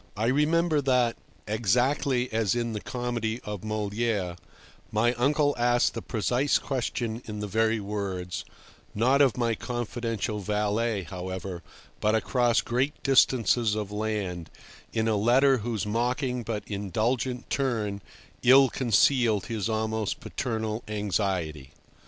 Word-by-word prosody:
I 110 - 0
remember 155 +3 +2
that, 125 -3 +2 0.3
exactly 125 +4 +1
as 110 -2 +1
in 120 -1 -1
the 105 - -4
comedy 120 -2 -3
of 105 -3 -5
Molière, 105 -3 -1 0.6
my 115 +3 +2
uncle 145 +4 +2
asked 120 0 +3
the 115 - -4
precise 125 +7 +1
question 120 -3 -3
in 105 -1 -6
the 105 - -3
very 110 +2 +1
words—not 100 +5 -2
of 135 -4 +4
my 120 -2 +1
confidential 115 -2 -3
valet, 105 +1 0
however, 95 0 -6 0.4
but 105 +1 +2
across 120 +1 +2
great 130 +5 -1
distances 120 -4 +3
of 105 -2 -3
land, 105 -6 -3 0.4
in 110 0 0
a 110 - +2
letter 130 +6 +4
whose 110 -2 -2
mocking 125 +4 -1
but 110 -2 -4
indulgent 115 +5 -2
turn 110 -7 -1 0.4
ill 130 +2 +7
concealed 120 -3 +3
his 110 -2 -2
almost 110 -1 -1
paternal 110 -3 -3
anxiety. 95 -8 -2
115 Hz, 120 wpm, -27 LUFS, 105-125 Hz, 0.6 s, ill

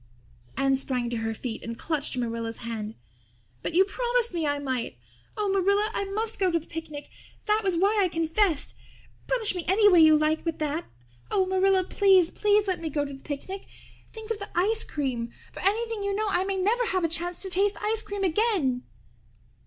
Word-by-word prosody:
Anne 270 0 +2
sprang 250 -3 -2
to 235 - -1
her 225 0 -2
feet 230 0 -5
and 230 0 -6
clutched 295 -3 -2
Marilla's 230 -1 -4
hand. 220 -2 -5 0.7
"But - - -4
you 380 +2 +6
promised 480 +1 0
me 330 -3 -1
I 290 0 0
might! 260 - -3 0.4
Oh, 420 -1 0
Marilla, 400 +2 +2
I 400 - -2
must 435 +3 -1
go 380 -2 +3
to 335 - +1
the 325 - -7
picnic. 310 -3 -8 0.3
That 425 0 +2
was 380 -3 +1
why 405 +4 +3
I 380 - +3
confessed. 330 0 +1 0.5
Punish 455 -5 +1
me 355 -2 -3
any 410 +4 +5
way 360 -4 +6
you 315 -1 +7
like 305 +1 +1
but 330 -2 -2
that. 305 +2 -2 0.4
Oh, 380 -2 +2
Marilla, 380 0 +2
please, 375 -2 +4
please, 420 0 +2
let 370 -3 -1
me 325 - -2
go 290 -1 -1
to 280 - -7
the 270 - -11
picnic. 375 +7 -6 0.4
Think 445 0 -8
of 435 - -2
the 405 - -7
ice 435 +5 +2
cream! 245 -5 -3 0.2
For - - -10
anything 445 +2 +1
you 400 0 -1
know 430 0 -1
I 370 0 +1
may 390 0 -2
never 450 +6 +1
have 370 -2 0
a - - +3
chance 345 +2 +3
to 380 - -5
taste 395 +3 +3
ice 440 +1 +1
cream 405 -2 -5
again." 360 - +1
365 Hz, 200 wpm, -26 LUFS, 290-410 Hz, 0.7 s, you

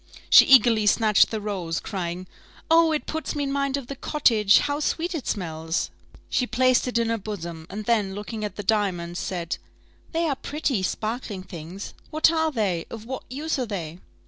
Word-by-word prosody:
She - - +10
eagerly 235 -5 +6
snatched 215 0 +4
the 220 - -3
rose, 185 -6 -3
crying, 180 -2 -4 0.5
"Oh! 330 0 +6
it 305 - -1
puts 320 -1 -4
me 290 - -1
in 275 - -2
mind 275 0 0
of 275 - -6
the 275 - -6
cottage: 225 -9 +3
how 290 0 0
sweet 335 +4 -1
it 315 -6 -5
smells!" 165 -3 -2 0.4
She 250 - 0
placed 255 0 +3
it 245 - 0
in 230 -1 +1
her 230 0 0
bosom, 170 -6 -6
and 210 +2 -6
then, 205 -4 +1
looking 215 +1 -5
at 205 -3 -4
the 205 - -5
diamonds, 185 -5 0
said, 175 -2 -3 0.5
"They 330 0 0
are 285 - 0
pretty, 275 -6 -2
sparkling 215 0 -3
things 175 +2 -8 0.2
what 310 +1 +4
are 320 -1 +1
they? 195 - -1
of 225 -1 -8
what 260 +2 -6
use 295 +3 -2
are 250 - -1
they?" 175 -5 -5
220 Hz, 190 wpm, -25 LUFS, 185-275 Hz, 0.5 s, She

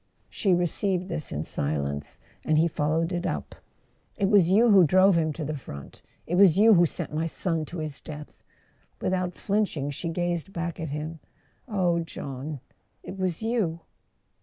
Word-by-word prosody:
She 190 -4 +2
received 180 +1 0
this 155 - -4
in 75 - -2
silence, 70 -1 -3 0.2
and 155 - +2
he 165 +2 +4
followed 160 +2 0
it 175 0 -1
up. - - -4 0.6
"It 195 -2 +1
was 200 -5 +5
you 220 +5 +5
who 195 -3 +8
drove 185 +3 +5
him 160 -2 +2
to 155 0 -5
the 155 - -3
front—it 70 - -10
was 185 -2 +6
you 220 +2 +7
who 175 -2 +5
sent - - -6
my 160 +2 0
son 165 -1 -1
to 175 - -8
his 155 -3 -5
death! 150 0 -10 0.3
" - - -39
Without 185 -1 -1
flinching, 195 -9 -1
she 165 +4 -4
gazed 175 +1 -2
back 170 0 -4
at 160 -2 -4
him. 155 +3 -5 0.5
"Oh, 180 -6 +1
John—it 145 +3 -8
was 185 +1 -2
you 210 -8 0
170 Hz, 165 wpm, -26 LUFS, 155-185 Hz, 0.6 s, who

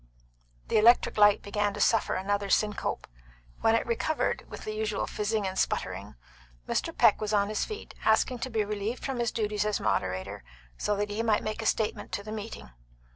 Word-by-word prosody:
The - - +4
electric 235 +3 +5
light 205 -1 +6
began 205 0 -1
to - - -6
suffer 225 +1 +2
another 200 +1 -1
syncope. 210 +1 0 0.5
When 225 - +3
it 230 - +1
recovered, 270 +7 -1
with - - -8
the 215 - -3
usual 215 -1 -1
fizzing 210 0 -1
and 190 0 -2
sputtering, 95 0 -2 0.5
Mr. - - -1
Peck - - +5
was 215 0 -2
on 200 -1 +2
his 215 - -1
feet, 430 0 -8
asking 230 +3 +2
to 260 - -3
be 220 -3 0
relieved 210 +3 -3
from 265 -3 -2
his 235 -1 +1
duties 210 -2 -1
as 210 -1 0
moderator, 95 -3 -2 0.3
so 210 - 0
that 205 +1 -2
he 210 +2 -1
might 220 -2 +2
make 215 +1 -3
a 220 - -1
statement 215 -2 -1
to 200 +2 -2
the 215 - -7
meeting. 215 - -7
210 Hz, 190 wpm, -28 LUFS, 205-220 Hz, 0.5 s, light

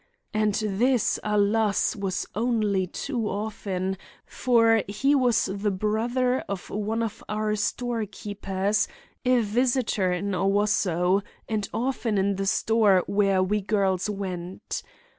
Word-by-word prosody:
And 215 -1 +1
this, 220 +3 +1
alas! 210 0 +2
was 195 -2 -2
only 210 -4 +1
too 235 +2 -3
often, 195 -3 -3 0.3
for 230 -3 +3
he 270 +8 +1
was 250 -5 +3
the 200 +1 -1
brother 235 +6 0
of 200 -2 -5
one 215 +2 -1
of 225 0 -5
our 215 0 0
storekeepers, 205 -3 -1 0.4
a 250 -1 +4
visitor 230 -3 +1
in 200 +3 -2
Owosso, 195 -1 +2 0.3
and 210 -3 -2
often 230 -2 -1
in 195 0 +1
the 195 0 -1
store 205 -3 +3
where 195 -2 +2
we 210 +3 0
girls 195 -1 0
went. 185 -3 -5
210 Hz, 120 wpm, -26 LUFS, 195-225 Hz, 0.4 s, a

